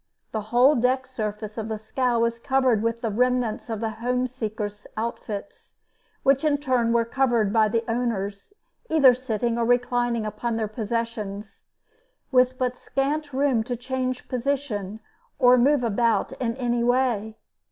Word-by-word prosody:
The 220 - -2
whole 250 +5 +5
deck 255 +1 +1
surface 215 -3 -5
of 220 - -4
the 220 -1 -3
scow 240 +3 -1
was 235 0 0
covered 260 -3 +2
with 230 +1 -1
the 225 -3 -1
remnants 250 0 0
of 220 -1 -3
the 225 -1 -1
homeseekers' 230 -4 -3
outfits, 220 +1 -5 0.5
which 275 +2 +3
in 300 -2 +3
turn 255 -5 +1
were 230 0 +3
covered 235 -4 +1
by 220 -2 +4
the 225 +2 0
owners, 225 - -2 0.4
either 280 -6 +6
sitting 235 -1 -2
or - - +2
reclining 245 -1 +1
upon 225 +2 -3
their 220 -1 -1
possessions, 215 -2 -4 0.7
with 255 0 +3
but 250 -1 -2
scant 290 +2 -2
room 265 -4 +1
to 245 +2 -3
change 255 +1 -3
position 245 -6 -2 0.4
or 250 0 +6
move 265 +2 +3
about 230 +1 +1
in 230 0 -1
any 240 -2 0
way. 240 -3 +1
240 Hz, 150 wpm, -25 LUFS, 220-255 Hz, 0.7 s, either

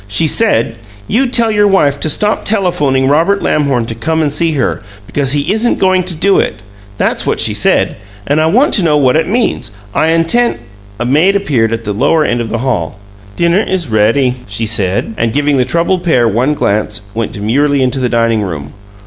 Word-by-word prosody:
"She 105 +10 0
said, 115 - +1 0.3
'You 255 +5 +1
tell 235 -2 +1
your 205 -1 +3
wife 145 -8 +2
to 155 - -1
stop 210 +8 0
telephoning 150 -10 +1
Robert 165 +8 +2
Lamhorn 140 -6 0
to 115 - -5
come 160 +8 -1
and 145 -2 -1
see 165 0 0
her, 140 - -1 0.2
because 135 +7 -1
he 145 +6 0
isn't 225 +2 0
going 185 -1 +2
to 180 -2 -5
do 195 +5 +2
it!' - - -2 0.4
That's - - -1
what - - 0
she - - +1
said! - - +1 0.3
And 145 +5 +1
I 160 - +2
want 250 - +2
to 195 - +3
know 155 -3 +2
what 130 -2 +2
it 160 - +1
means. 215 - -1 0.2
I 155 - +1
intend 165 - +2 0.2
" 100 +1 -24
A 120 - -2
maid 155 +10 +2
appeared 135 - 0
at 115 0 -3
the 105 -2 -3
lower 145 +8 +2
end 120 0 0
of 115 - -4
the 115 - -2
hall. 95 -8 -2 0.4
"Dinner 170 +3 +2
is 185 - -2
ready," 115 +4 +2
she 105 +3 -3
said, 105 -1 -1
and, 115 -1 -1
giving 145 0 +1
the 125 - +2
troubled 170 +5 0
pair 125 -9 +2
one 125 +7 0
glance, 105 -3 -1
went 115 -1 -3
demurely 135 +7 +1
into 130 +1 -1
the 125 -1 0
dining 115 -2 +1
room. 75 -7 -6
145 Hz, 210 wpm, -13 LUFS, 115-170 Hz, 0.4 s, your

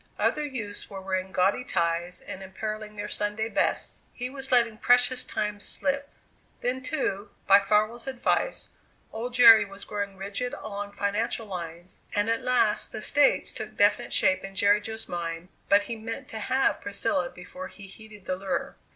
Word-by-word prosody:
Other 300 - +1
youths 230 -8 -5
were 195 -2 -7
wearing 190 0 -2
gaudy 190 +6 +2
ties 170 -2 -1
and 190 - -8
imperilling 215 +2 -5
their 205 0 -4
Sunday 210 +2 -1
bests; - - -1
he 250 +1 -5
was 270 -1 -2
letting 235 -3 +3
precious 250 +1 +4
time 210 0 -3
slip. 280 +6 -2 0.5
Then, 255 +1 -1
too, 220 -7 -2 0.2
by 195 +1 +8
Farwell's 215 +5 +1
advice, 270 - 0 0.4
old 240 +2 -4
Jerry 230 -3 +9
was 200 0 -10
growing 200 -2 -4
rigid 200 +6 -3
along 205 0 -6
financial 210 +3 -1
lines, 175 -2 -7 0.2
and 205 +2 +2
at 230 - 0
last 245 -4 +2
the - - -6
States 290 -1 +4
took - - -7
definite - - +3
shape 185 0 +3
in 195 0 -8
Jerry 205 +1 +4
Jo's 220 +1 -6
mind, 170 0 -4 0.2
but 200 +1 +6
he 230 - -5
meant 225 +1 -6
to 220 - -5
have 260 +5 +1
Priscilla 230 +7 -1
before 265 +10 -9
he 200 - -13
heeded 210 0 -13
the 185 - -1
lure. 195 0 -3
210 Hz, 170 wpm, -27 LUFS, 195-240 Hz, 0.5 s, Jerry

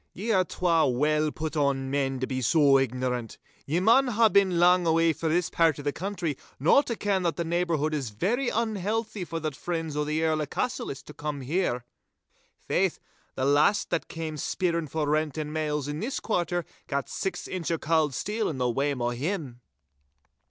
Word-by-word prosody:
'Ye 220 +5 -2
are 190 -3 +4
twa 165 -3 +2
well 150 +4 +1
put 155 +1 -4
on 140 -2 0
men 135 -2 0
to - - +1
be 130 0 -3
so 140 +1 +5
ignorant. 125 -2 -2 0.3
Ye 160 +5 +1
maun 235 +8 +5
hae 230 -1 +4
been 195 -3 +3
lang 180 0 +5
awa' 165 0 +3
frae 160 +2 -2
this 175 +2 +1
pairt 165 -4 +3
o' - - -6
the 145 - 0
country 180 -5 -3 0.2
no 160 - +5
to 240 -5 -4
ken 200 -3 0
that 170 -2 0
the 170 - -2
neighbourhood 165 -3 0
is 140 -6 -2
very 230 - 0
unhealthy 220 -1 -1
for 165 -1 -4
the 155 -1 -2
friends 160 +3 -4
o' 150 - +1
the 155 +2 -1
Earl 155 -1 +1
o' 150 - -2
Cassillis 145 - -3
to 150 - -12
come 150 -2 -4
here. 130 -4 -1 0.7
Faith, - - 0 0.4
the 130 - -1
last 150 +9 +3
that - - -1
cam' 160 -2 -5
speerin' 170 +2 -1
for 150 +1 -2
rent 155 0 0
and 150 -1 -3
mails 150 -2 -1
in 145 +1 -4
this 255 +7 -2
quarter 175 -5 -1 0.2
gat 140 -1 -2
six 195 - -4
inch 175 -5 -4
o' 165 - +1
cauld 155 -3 +1
steel 215 - -1
in 150 - -4
the 125 -1 +1
wame 135 0 -1
o' 120 - +1
him! 135 -2 -4
160 Hz, 195 wpm, -27 LUFS, 140-180 Hz, 0.7 s, so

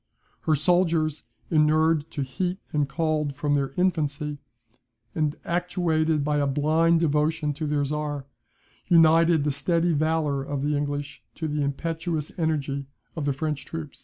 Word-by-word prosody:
Her 155 - +5
soldiers, 160 -1 +1 0.3
inured 155 0 +3
to 145 - -3
heat 175 +8 -2 0.2
and 145 -2 +1
cold 155 -2 -1
from 145 +1 0
their 140 -2 0
infancy, 150 -5 0 0.7
and 155 -1 0
actuated 165 -3 0
by 150 0 +1
a 145 -1 +1
blind 160 +4 +3
devotion 150 0 +1
to 155 +2 -4
their 145 -1 +1
Czar, 145 -1 -3 0.6
united 165 -1 +5
the 150 - +1
steady 165 +5 +1
valour 155 -2 +1
of 140 0 -3
the 150 +1 +1
English 145 -2 -3
to 160 - -3
the 150 0 -1
impetuous 160 +2 -2
energy 140 -4 -1 0.3
of 155 -4 -3
the 140 - +1
French 150 0 -3
troops." 160 -1 -7
150 Hz, 145 wpm, -25 LUFS, 145-165 Hz, 0.7 s, Her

